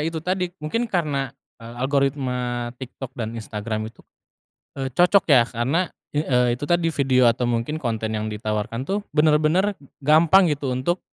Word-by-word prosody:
itu 160 Hz, 0 st, -2 dB
tadi 180 Hz, +1 st, -1 dB
mungkin 230 Hz, +11 st, -2 dB
karena, 145 Hz, -, -1 dB, 0.3 s
eee, 115 Hz, +1 st, -10 dB
algoritma 130 Hz, -3 st, -1 dB
TikTok 130 Hz, 0 st, -8 dB
dan 115 Hz, -1 st, -4 dB
Instagram 110 Hz, 0 st, -4 dB
itu, 115 Hz, -, -18 dB, 0.8 s
eee, 135 Hz, -1 st, -2 dB
cocok 180 Hz, +4 st, +4 dB
ya 130 Hz, -5 st, +7 dB
karena 135 Hz, +10 st, 0 dB, 0.2 s
i 145 Hz, -, 0 dB
eee, 125 Hz, -4 st, +2 dB
itu -, -, -3 dB
tadi 175 Hz, -1 st, +2 dB
video 130 Hz, -3 st, +2 dB
atau 120 Hz, +1 st, -2 dB
mungkin 120 Hz, +6 st, -1 dB
konten 110 Hz, -4 st, -2 dB
yang 110 Hz, 0 st, -2 dB
ditawarkan 110 Hz, +3 st, -3 dB
tuh 195 Hz, +8 st, -1 dB, 0.2 s
benar-benar 155 Hz, +6 st, +3 dB, 0.3 s
gampang 160 Hz, +5 st, +5 dB
gitu 140 Hz, -3 st, -2 dB
untuk, 170 Hz, +8 st, -1 dB
135 Hz, 155 wpm, -23 LUFS, 120-160 Hz, 0.8 s, ya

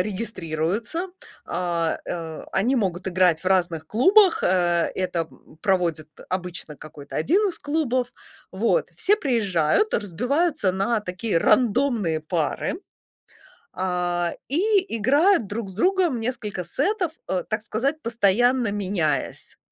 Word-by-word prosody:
регистрируются, 205 Hz, -, -2 dB, 0.4 s
а, 170 Hz, -2 st, -1 dB
э, 165 Hz, -2 st, -6 dB
они 235 Hz, +8 st, +1 dB
могут 185 Hz, -4 st, -2 dB
играть 180 Hz, -3 st, +2 dB
в -, -, -8 dB
разных 175 Hz, -4 st, +1 dB
клубах, 375 Hz, -, +5 dB
э, 175 Hz, -2 st, +2 dB
это, 180 Hz, -2 st, -1 dB
м, 155 Hz, -, -20 dB
проводит 170 Hz, -6 st, 0 dB, 0.2 s
обычно 180 Hz, -5 st, -4 dB
какой-то 145 Hz, -2 st, -12 dB
1 380 Hz, -, +2 dB
из 355 Hz, -, -1 dB
клубов. 260 Hz, -5 st, -1 dB, 0.4 s
Вот 230 Hz, -, 0 dB
все 415 Hz, +2 st, +4 dB
приезжают, 230 Hz, -, +1 dB
разбиваются 245 Hz, -, 0 dB
на 200 Hz, +4 st, 0 dB
такие 190 Hz, 0 st, -1 dB
рандомные 215 Hz, -, +2 dB
пары, 165 Hz, -, -2 dB, 0.9 s
а, 175 Hz, -2 st, -1 dB, 0.2 s
и 380 Hz, -, +2 dB
играют 285 Hz, -, +3 dB
друг 205 Hz, 0 st, -5 dB
с 190 Hz, -, -9 dB
другом 355 Hz, -, +1 dB
несколько 220 Hz, -5 st, -4 dB
сетов, 360 Hz, -, -1 dB, 0.2 s
э, 185 Hz, -2 st, -1 dB
так 215 Hz, 0 st, -1 dB
сказать, 270 Hz, +8 st, -2 dB
постоянно 235 Hz, +1 st, +2 dB
меняясь. 190 Hz, -6 st, -2 dB
205 Hz, 120 wpm, -23 LUFS, 175-260 Hz, 0.9 s, клубах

